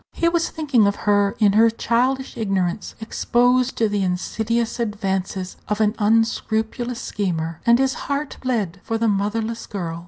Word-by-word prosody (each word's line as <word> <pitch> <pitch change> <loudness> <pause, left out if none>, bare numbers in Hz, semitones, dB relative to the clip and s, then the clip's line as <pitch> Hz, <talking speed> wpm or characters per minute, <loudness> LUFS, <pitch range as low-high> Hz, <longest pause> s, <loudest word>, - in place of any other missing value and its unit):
He 335 - +1
was 335 0 +1
thinking 280 -9 +2
of 200 - +1
her 205 0 +3
in 205 -3 +4
her 225 +2 +6
childish 250 +4 0
ignorance, 195 -5 -2
exposed 245 +3 +1
to 225 - +3
the 205 -1 -1
insidious 220 +6 -1
advances 195 -4 -2
of 210 0 -1
an 210 -1 +3
unscrupulous 225 +2 0
schemer, 170 -9 -3
and 235 0 +7
his 265 0 +1 0.2
heart 280 +1 -2
bled 225 -10 -2
for 225 - -2
the 230 0 +1
motherless 215 +3 -1
girl. 170 -5 -4
220 Hz, 155 wpm, -22 LUFS, 200-240 Hz, 0.2 s, and